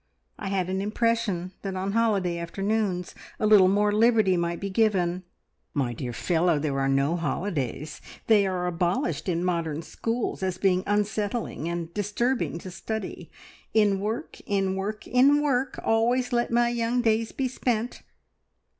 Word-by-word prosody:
"I - - -4
had 190 -2 0
an 190 +1 -1
impression 210 -4 0
that 195 -1 -4
on 190 +1 -2
holiday 200 -6 +1
afternoons 195 +1 -1 0.3
a - - +1
little 210 -3 +7
more 205 +2 +3
liberty 215 -3 +4
might 170 0 -1
be 200 0 -4
given?" 185 -4 +1 0.5
"My 130 -4 0
dear 120 +1 -5
fellow, 170 +5 +1
there 145 -2 -1
are 135 0 +1
no 140 +4 +2
holidays! 150 - -3 0.2
They 210 -3 +4
are 180 -1 -1
abolished 180 +7 -1
in 175 0 0
modern 165 -3 -1
schools 230 +6 -3
as 185 -1 -1
being 185 -1 +2
unsettling, 205 -4 -1
and 170 -1 -4
disturbing 210 +2 -1
to 185 - -8
study. 220 +2 -5 0.5
`In 205 -3 +4
work, 215 +4 -4
in 195 -2 0
work, 210 +3 -4
in 275 +4 +5
work 270 -3 0
always 245 +3 +2
let 240 0 +1
my 240 0 +3
young 240 +1 0
days 225 0 +1
be 265 - -1
spent!' 245 -2 -2
195 Hz, 155 wpm, -26 LUFS, 175-225 Hz, 0.5 s, little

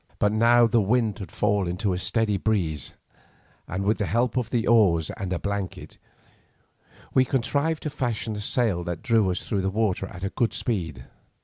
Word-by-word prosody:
But 105 - +2
now 120 +2 +5
the 115 0 +3
wind 110 +1 +1
had 95 -6 -7
fallen 100 -4 0
to 100 -1 0
a 90 - -2
steady 110 +1 0
breeze, 90 - -1 0.7
and 95 +3 -3
with 105 +2 +1
the 105 - 0
help 115 +7 +1
of 125 -3 -1
the 115 -2 0
oars 95 -9 +4
and 95 -4 -5
a 90 - 0
blanket, 100 0 -5 1.1
we 130 - +5
contrived 140 +5 0
to 150 - -3
fashion 120 -5 -2
a - - -5
sail 105 -5 0
that 85 -1 -5
drew 115 -6 +3
us 90 - -3
through 100 -3 0
the 95 - 0
water 100 -2 0
at 90 0 -10
a 95 - -2
good 120 -3 0
speed. 80 - -3
105 Hz, 190 wpm, -25 LUFS, 95-115 Hz, 1.1 s, now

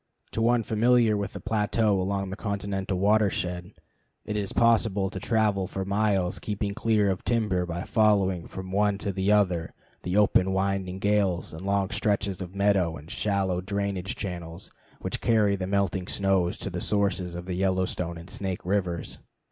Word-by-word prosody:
To 115 - -2
one 120 0 +3
familiar 115 0 +3
with 100 -2 -3
the - - -6
plateau 105 -2 +1
along 95 0 -2
the - - -3
continental 100 -2 -3
watershed 95 -3 +1 0.5
it 105 - -3
is 100 -2 -2
possible 110 -4 +2
to - - -5
travel 105 -4 +1
for 95 +1 -4
miles 100 -2 +1
keeping 105 -1 -3
clear 105 -3 +2
of 95 - -4
timber 105 -7 0
by 85 +1 -4
following 100 -5 +2
from 95 0 -7
one 100 0 +2
to 100 0 -3
the 95 +2 +1
other 90 -6 +2 0.3
the 90 +2 -1
open, 95 -2 +4
winding 95 -1 -1
glades 100 -4 +1
and 80 - -8
long 100 0 0
stretches 100 -2 0
of 90 +1 -7
meadows 100 -4 +2
and 75 +3 -12
shallow 95 -3 0
drainage 100 -1 -2
channels 85 -3 -6 0.3
which - - -3
carry 105 -3 +3
the 95 -1 -4
melting 95 -2 0
snows 95 -4 +1
to - - -5
the - - -4
sources 95 -4 0
of 90 0 -6
the 95 - -4
Yellowstone 90 -2 -1
and 85 +1 -10
Snake 95 -5 -4
rivers. 90 -3 -2
100 Hz, 170 wpm, -27 LUFS, 90-105 Hz, 0.5 s, open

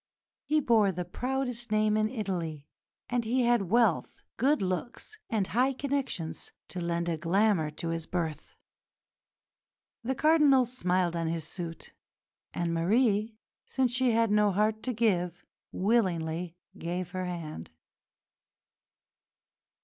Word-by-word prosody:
He 310 +1 +2
bore 225 -7 +3
the 180 0 -4
proudest 250 +3 -3
name 215 0 +3
in 215 0 +2
Italy, 175 - -4 0.4
and 245 -1 0
he 245 +3 +1
had 235 -6 +2
wealth, 230 -5 +2 0.2
good 280 +5 +3
looks, 190 - -4
and 215 -4 +1
high 255 +7 +1
connections 260 - -3 0.2
to 180 - -5
lend 170 0 -1
a 165 -2 -1
glamour 175 -1 +2
to 165 +2 -5
his 165 -1 -3
birth. 160 -4 -4 1.5
The 265 +3 -1
Cardinal 295 -3 +5
smiled 180 -8 0
on 165 -1 -1
his 165 -1 -2
suit, 165 -2 -7 0.6
and 170 -1 -2
Marie, 215 +5 +2 0.3
since 260 -2 +1
she 255 0 +2
had 230 -1 +2
no 210 -1 +4
heart 215 +3 +1
to 255 - -1
give, 180 -5 0 0.3
willingly 180 -5 0 0.2
gave 175 +1 -4
her 185 0 -3
hand. 165 - -6
205 Hz, 125 wpm, -29 LUFS, 170-240 Hz, 1.5 s, Cardinal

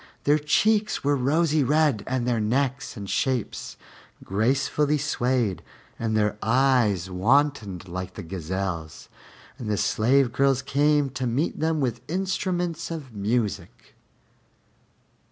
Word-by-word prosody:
Their 150 +2 +3
cheeks 210 +8 +1
were 145 +1 +2
rosy 150 +3 +2
red, 145 -5 +2
and 130 -2 -1
their 120 -2 +1
necks 130 +4 -1
and 100 -1 -6
shapes 125 +1 -2 0.5
gracefully 135 +8 +1
swayed, 125 - 0 0.4
and 110 -1 0
their 105 0 0
eyes 115 -7 +2
wantoned 105 - +1
like 90 +1 -6
the 100 - -7
gazelle's; 85 -1 -5 0.5
and 115 - -5
the 105 - 0
slave 125 +5 +2
girls 135 -1 +2
came 145 0 +2
to 130 0 -3
meet 130 +8 -1
them 160 0 +1
with 120 -3 -1
instruments 180 -2 -2
of 150 -7 -7
music. 105 -3 -3
130 Hz, 120 wpm, -25 LUFS, 105-145 Hz, 0.5 s, Their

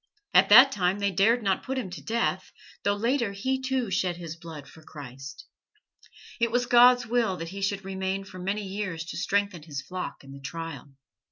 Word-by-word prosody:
At - - +6
that 270 +2 +9
time 185 -4 0
they 200 -1 0
dared 225 +6 +3
not 195 -2 +1
put 265 0 -4
him 210 -8 -4
to 180 - -8
death, 225 -5 -1 0.3
though 200 0 +1
later 230 0 0
he, 260 +7 -2
too, 260 -5 -1
shed 180 -1 0
his 165 -2 -7
blood 160 -4 -10
for 160 - -15
Christ. 135 -3 -10 0.9
It 235 0 +2
was 245 +2 +1
God's 245 0 +6
will 230 -5 0
that 165 0 -6
he 195 +2 -7
should 195 0 -2
remain 190 0 -3
for 185 -1 -11
many 195 +3 -2
years 190 -4 -4
to - - -7
strengthen 200 -4 0
his 145 -3 -6
flock 185 -4 -6
in 135 - -13
the 140 0 -11
trial." 165 +1 -7
195 Hz, 195 wpm, -27 LUFS, 170-230 Hz, 0.9 s, that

